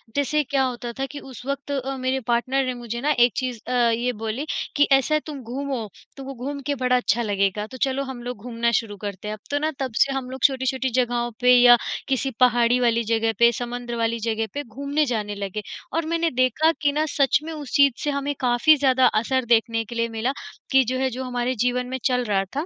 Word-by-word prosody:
जैसे 295 Hz, +1 st, +1 dB
क्या 270 Hz, 0 st, 0 dB
होता 245 Hz, -2 st, -3 dB
था 270 Hz, -, 0 dB
कि 290 Hz, -, -7 dB
उस 260 Hz, -3 st, -11 dB
वक़्त 280 Hz, +1 st, -4 dB
अ, 270 Hz, -1 st, -2 dB
मेरे 260 Hz, +1 st, -1 dB
पार्टनर 255 Hz, +3 st, +1 dB
ने 255 Hz, -, -1 dB
मुझे 235 Hz, -1 st, -6 dB
ना, 295 Hz, +3 st, +1 dB
एक 245 Hz, -3 st, +4 dB
चीज़ 250 Hz, -3 st, -2 dB
अ, -, -, -3 dB, 0.2 s
ये 240 Hz, +2 st, 0 dB
बोली 225 Hz, +7 st, -3 dB, 0.3 s
कि, 290 Hz, -, +4 dB
"ऐसा 270 Hz, +3 st, +4 dB
है, -, -, +3 dB
तुम 290 Hz, -4 st, -7 dB
घूमो। 255 Hz, -1 st, -4 dB, 0.3 s
तुमको 275 Hz, 0 st, -7 dB
घूम 285 Hz, 0 st, -4 dB
के 285 Hz, -, 0 dB
बड़ा 250 Hz, -1 st, +1 dB
अच्छा 240 Hz, -1 st, +1 dB
लगेगा। 205 Hz, -1 st, 0 dB
तो 260 Hz, -, -10 dB
चलो, 270 Hz, +1 st, -1 dB
हम 265 Hz, -3 st, -7 dB
लोग 245 Hz, -2 st, -5 dB
घूमना 235 Hz, -1 st, -1 dB
शुरू 205 Hz, -3 st, -10 dB
करते 200 Hz, 0 st, -6 dB
हैं।" 215 Hz, -, -3 dB
अब -, -, -19 dB
तो 290 Hz, -, +1 dB
ना, 310 Hz, +1 st, 0 dB
तब 260 Hz, -3 st, -2 dB
से 275 Hz, -, +4 dB
हम 265 Hz, -2 st, -4 dB
लोग 260 Hz, -1 st, -8 dB
छोटी-छोटी 260 Hz, -1 st, +1 dB
जगहों 240 Hz, -1 st, -1 dB
पे, 250 Hz, 0 st, +6 dB
या 245 Hz, 0 st, +8 dB, 0.3 s
किसी 270 Hz, 0 st, 0 dB
पहाड़ी 245 Hz, -1 st, +4 dB
वाली 235 Hz, -1 st, +2 dB
जगह 225 Hz, 0 st, +1 dB
पे, 235 Hz, 0 st, +6 dB
समंदर 240 Hz, 0 st, -5 dB
वाली 230 Hz, 0 st, 0 dB
जगह 225 Hz, 0 st, -1 dB
पे 290 Hz, -, -3 dB
घूमने 280 Hz, +5 st, -1 dB
जाने 210 Hz, -5 st, -2 dB
लगे। 200 Hz, +1 st, -4 dB, 0.3 s
और 330 Hz, -1 st, 0 dB
मैंने 335 Hz, 0 st, 0 dB
देखा 255 Hz, +6 st, +3 dB
कि 290 Hz, -1 st, +3 dB
ना, 305 Hz, +2 st, 0 dB
सच 280 Hz, -1 st, +2 dB
में, 325 Hz, -, -6 dB
उस 295 Hz, -4 st, -8 dB
चीज़ 280 Hz, -3 st, +5 dB
से 295 Hz, -, 0 dB
हमें 280 Hz, +1 st, -2 dB
काफ़ी 250 Hz, +5 st, +4 dB
ज़्यादा 260 Hz, -2 st, +3 dB, 0.2 s
असर 260 Hz, +2 st, 0 dB
देखने 230 Hz, -1 st, +2 dB
के 235 Hz, -, -9 dB
लिए 230 Hz, 0 st, 0 dB
मिला, 225 Hz, +3 st, -1 dB, 0.4 s
कि 265 Hz, -1 st, +6 dB
जो 255 Hz, +2 st, -2 dB
है, 265 Hz, 0 st, +1 dB
जो 255 Hz, +1 st, -5 dB
हमारे 250 Hz, 0 st, -2 dB
जीवन 250 Hz, 0 st, 0 dB
में 260 Hz, +1 st, -3 dB
चल 250 Hz, -1 st, +2 dB
रहा 195 Hz, -3 st, +1 dB
था, 295 Hz, -, -1 dB
250 Hz, 235 wpm, -23 LUFS, 235-275 Hz, 0.4 s, या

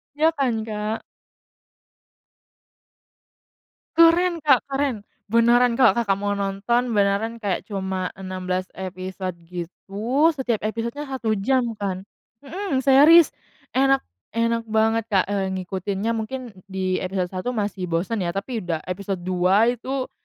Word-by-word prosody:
Ya, 315 Hz, +2 st, +4 dB
kan, 235 Hz, -5 st, +1 dB
Kak? 215 Hz, 0 st, -2 dB, 3.0 s
Keren, 335 Hz, 0 st, +5 dB
Kak, 270 Hz, -4 st, +4 dB
keren! 270 Hz, -6 st, -2 dB, 0.2 s
Beneran, 235 Hz, +1 st, +4 dB
Kak, 255 Hz, -4 st, +6 dB
Kakak 200 Hz, -5 st, +1 dB
mau 205 Hz, 0 st, -1 dB
nonton, 200 Hz, +5 st, 0 dB
beneran 210 Hz, +2 st, +1 dB
kayak 200 Hz, -4 st, -2 dB
cuma 190 Hz, -2 st, -2 dB
16 185 Hz, -1 st, -3 dB
episode 185 Hz, -1 st, -5 dB
gitu, 205 Hz, -, -1 dB
setiap 245 Hz, -6 st, -1 dB
episodenya 235 Hz, +7 st, -4 dB
1 260 Hz, -5 st, -3 dB
jam 240 Hz, 0 st, 0 dB
kan. 190 Hz, -2 st, -3 dB, 0.4 s
Mhm, 315 Hz, -3 st, -2 dB
series 290 Hz, +5 st, +7 dB, 0.4 s
enak 270 Hz, +1 st, +3 dB, 0.3 s
enak 230 Hz, 0 st, 0 dB
banget, 220 Hz, +1 st, +1 dB
Kak, 195 Hz, -4 st, +2 dB
eee, 195 Hz, -1 st, 0 dB
ngikutinnya 190 Hz, +3 st, -3 dB
mungkin 230 Hz, +2 st, -4 dB, 0.2 s
di 190 Hz, -1 st, -1 dB
episode 185 Hz, -1 st, -2 dB
1 195 Hz, +7 st, -3 dB
masih 205 Hz, -4 st, -2 dB
bosen 175 Hz, +7 st, -1 dB
ya, 175 Hz, -1 st, -2 dB
tapi 225 Hz, +4 st, -3 dB
udah 170 Hz, -4 st, -3 dB
episode 185 Hz, 0 st, -4 dB
2 185 Hz, +5 st, +3 dB
itu 255 Hz, +2 st, -4 dB
220 Hz, 125 wpm, -23 LUFS, 190-250 Hz, 3.0 s, series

